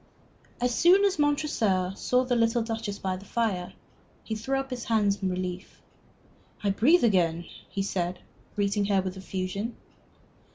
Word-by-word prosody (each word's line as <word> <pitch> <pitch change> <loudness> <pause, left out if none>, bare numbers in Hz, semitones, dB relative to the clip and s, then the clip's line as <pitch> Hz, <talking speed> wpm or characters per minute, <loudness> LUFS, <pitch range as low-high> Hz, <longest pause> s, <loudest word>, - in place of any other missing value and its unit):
As 245 0 +1
soon 370 +9 +5
as 380 -5 +1
Montresor 230 -11 +1
saw 250 +5 +1
the 250 -1 +1
little 230 0 +2
Duchess 225 -3 -4
by 185 -1 -2
the 190 - -11
fire, 200 -6 -1 0.5
he 220 - -4
threw 230 +5 -1
up 270 0 -5
his 245 -2 -4
hands 210 -3 +1
in 190 - 0
relief. 180 +1 -5 0.8
"I 200 - +2
breathe 285 - +4
again," 175 -6 +2 0.2
he 195 - -2
said, 180 -2 -2 0.4
greeting 205 0 +1
her 195 -2 +2
with 185 0 -4
effusion. 190 +4 -4
205 Hz, 155 wpm, -27 LUFS, 185-240 Hz, 0.8 s, soon